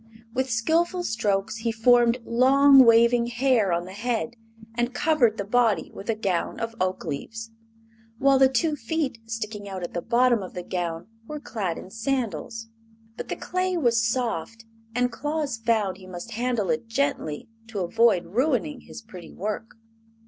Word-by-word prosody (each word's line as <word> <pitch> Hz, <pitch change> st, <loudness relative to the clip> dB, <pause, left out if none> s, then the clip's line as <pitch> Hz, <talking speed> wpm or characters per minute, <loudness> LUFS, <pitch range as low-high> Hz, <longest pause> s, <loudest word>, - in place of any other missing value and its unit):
With 260 Hz, +1 st, -1 dB
skillful 330 Hz, +10 st, +1 dB
strokes 210 Hz, -, -1 dB
he 230 Hz, +1 st, -1 dB
formed 240 Hz, +1 st, +4 dB
long, 270 Hz, +3 st, +6 dB
waving 235 Hz, 0 st, +5 dB
hair 240 Hz, -5 st, +2 dB
on 170 Hz, +1 st, 0 dB
the 185 Hz, -, -9 dB
head 235 Hz, +2 st, -2 dB, 0.4 s
and 240 Hz, +1 st, -2 dB
covered 250 Hz, -8 st, +2 dB
the 200 Hz, -, -2 dB
body 220 Hz, -5 st, +2 dB
with 200 Hz, -, -9 dB
a 225 Hz, -, +2 dB
gown 195 Hz, -4 st, -2 dB
of 230 Hz, 0 st, -3 dB
oakleaves, 185 Hz, +5 st, -3 dB, 0.7 s
while 275 Hz, +2 st, +4 dB
the 265 Hz, 0 st, +6 dB
two 295 Hz, +4 st, +1 dB
feet 275 Hz, -1 st, -2 dB
sticking 215 Hz, -2 st, -5 dB
out 190 Hz, -2 st, -5 dB
at 175 Hz, -, -5 dB
the 175 Hz, -, -2 dB
bottom 240 Hz, 0 st, +3 dB
of 185 Hz, -, -8 dB
the 180 Hz, -, -4 dB
gown 170 Hz, -2 st, -3 dB, 0.2 s
were 300 Hz, 0 st, -5 dB
clad 195 Hz, -, -3 dB
in 185 Hz, -, -10 dB
sandals. 225 Hz, -1 st, -3 dB, 0.5 s
But -, -, -6 dB
the -, -, -3 dB
clay 365 Hz, 0 st, -1 dB
was 235 Hz, -7 st, +3 dB
soft, 225 Hz, -2 st, -2 dB, 0.3 s
and 245 Hz, 0 st, +1 dB
Claus 295 Hz, -3 st, -2 dB
found 220 Hz, -5 st, 0 dB
he 190 Hz, -1 st, -13 dB
must 185 Hz, +5 st, -8 dB
handle 235 Hz, -2 st, 0 dB
it 235 Hz, -1 st, -2 dB
gently 230 Hz, -, -2 dB, 0.2 s
to 215 Hz, -3 st, -4 dB
avoid 200 Hz, 0 st, +3 dB
ruining 255 Hz, -, 0 dB
his 235 Hz, -, -11 dB
pretty 185 Hz, -6 st, -11 dB
work. 215 Hz, +3 st, -4 dB
230 Hz, 165 wpm, -25 LUFS, 205-255 Hz, 0.7 s, long